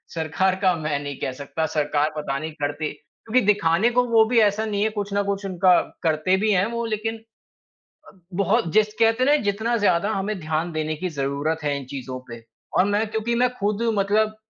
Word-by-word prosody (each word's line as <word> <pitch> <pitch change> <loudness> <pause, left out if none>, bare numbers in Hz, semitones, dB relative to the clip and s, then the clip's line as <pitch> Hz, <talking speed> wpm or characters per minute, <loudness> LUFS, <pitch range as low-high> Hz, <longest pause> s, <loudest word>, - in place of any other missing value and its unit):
सरकार 165 +4 0
का 185 -2 +4
मैं 155 -3 -2
नहीं 145 -1 -5
कह - - -2
सकता, 140 +4 -4
सरकार 150 -1 0
पता 140 -3 -2
नहीं 155 +2 -5
करती 145 0 -3 0.4
क्योंकि 250 +3 +3
दिखाने 200 +1 +3
को 250 +1 +3
वो 225 -2 +5
भी 235 0 +3
ऐसा 210 +1 +2
नहीं 205 -2 -2
है 220 - +2
कुछ 205 -2 -4
ना 200 - +2
कुछ 200 0 -3
उनका 185 -1 +4 0.2
करते 160 +3 +2
भी 215 +2 +1
हैं 190 -1 +3
वो 235 0 -2
लेकिन 225 0 -2 0.9
अ, - - -14 0.2
बहुत 200 0 +1
जिस 215 0 +3
कहते 225 +2 +3
हैं 270 - +3
ना - - +6
जितना 220 +4 0
ज़्यादा 200 -2 +2
हमें 200 0 -2
ध्यान 160 +1 -2
देने 155 -1 -2
की 180 +4 -3
ज़रूरत 145 +3 -1
है 145 -1 0
इन 135 - -9
चीज़ों 130 -1 -6
पे 115 -1 -9 0.3
और 185 - +5
मैं 205 +2 +1
क्योंकि 220 +2 -1
मैं 250 - +4
खुद 205 +1 -1 0.2
मतलब 215 +2 +1
190 Hz, 205 wpm, -23 LUFS, 155-215 Hz, 0.9 s, ना